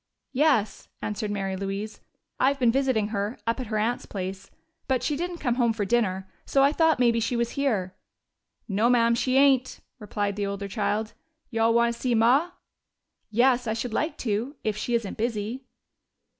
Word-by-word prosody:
"Yes," 265 -7 +1 0.2
answered 210 0 -3
Mary 195 -2 -2
Louise. 200 +2 -5 0.4
"I've 275 +2 +3
been 245 -3 +3
visiting 255 -5 +1
her, 205 +2 -2
up 230 +3 0
at 255 - -4
her 215 0 -2
aunt's 230 +3 -1
place. 190 0 -5 0.4
But 260 -2 +1
she 295 - 0
didn't 350 +3 -3
come 245 -7 0
home 235 -1 +3
for 215 -2 -2
dinner, 190 -4 0 0.2
so 275 - +2
I 280 - +5
thought 320 0 +3
maybe 235 -2 +3
she 230 +2 -1
was 235 0 0
here." 215 -10 -1 0.7
"No, 215 +3 +2
ma'am, 235 -1 +4
she 255 +2 +1
ain't," 270 -2 +3 0.2
replied 205 -1 -3
the 205 - -1
older 200 0 -4
child. 215 +1 -1 0.4
"You 225 -1 -1
all 230 +1 +4
want 235 0 +3
to 235 - -12
see 250 -2 +1
Ma?" 250 +9 +4 0.8
"Yes, 245 +2 +3
I 220 - +1
should 225 +1 -4
like 310 +7 -1
to. 230 +6 -1
If 215 -1 0
she 235 +3 -1
isn't 230 -4 -2
busy." 230 +3 -2
230 Hz, 185 wpm, -26 LUFS, 210-255 Hz, 0.8 s, I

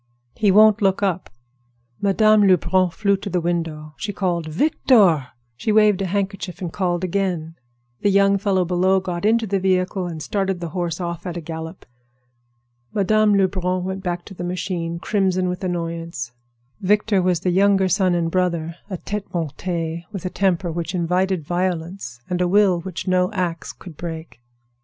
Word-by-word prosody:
"He 210 -3 +1
won't 215 +2 +6
look 195 0 +2
up." 185 -2 -1 0.7
Madame 210 +1 +4
Lebrun 185 0 +3
flew 200 +3 +1
to 200 +1 -6
the 180 -1 0
window. 165 -3 -3
She 210 - -3
called 175 -5 -1
"Victor!" 185 - +3 0.3
She 165 - -1
waved 210 -2 +4
a 195 - -1
handkerchief 195 -1 -3
and 175 -3 -5
called 175 -2 -1
again. 180 -3 -1 0.5
The 205 - +3
young 200 0 +4
fellow 190 -2 +1
below 185 +2 +2
got 180 0 -4
into 225 +1 +3
the 200 -1 0
vehicle 185 0 0
and 165 -2 -6
started 195 +2 -1
the 170 -1 -4
horse 175 -1 -3
off 170 0 -4
at 175 -1 -4
a - - -2
gallop. 160 +2 -7 1.1
Madame 210 +1 +3
Lebrun 185 -2 +1
went 190 +1 -4
back 175 -2 -3
to - - -10
the 180 - -7
machine, 175 -1 -3
crimson 185 -1 0
with 180 +1 -4
annoyance. 165 -8 -4 0.5
Victor 205 0 +2
was 180 -2 +1
the 180 - +1
younger 195 +1 +3
son 185 -1 +2
and 165 -1 0
brother—a 180 +1 -2
tête 205 +3 -5
montée, 165 +1 -3
with 195 -2 -6
a 180 - -2
temper 185 -2 0
which 170 +2 -4
invited 180 0 0
violence 175 -7 -3
and 180 0 -1
a 180 - +2
will 190 -1 +4
which 185 +1 -6
no 185 +1 +2
ax 175 -4 -2
could 170 -5 -13
break. 160 -7 -7
185 Hz, 165 wpm, -21 LUFS, 170-195 Hz, 1.1 s, won't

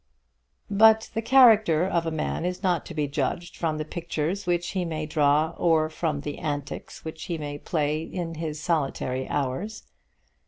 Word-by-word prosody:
But 220 +2 +5
the 225 - -1
character 220 -9 +6
of 170 -3 0
a - - +2
man 155 +1 -2
is 180 +2 -3
not 180 -3 +1
to 170 - -8
be 150 -2 0
judged 145 +5 -2
from 160 -2 -1
the 155 - -3
pictures 170 +3 -3
which 175 0 0
he 190 -2 -1
may 160 -2 -3
draw 150 +1 +2
or 160 -2 +3
from 155 -3 -2
the 145 0 -5
antics 145 -1 -5
which 160 0 -6
he 170 -3 -3
may 145 -1 -5
play 155 -1 -1
in 165 0 -5
his 155 -1 -4
solitary 135 -5 -1
hours. 145 +11 -2
160 Hz, 170 wpm, -26 LUFS, 150-180 Hz, -, character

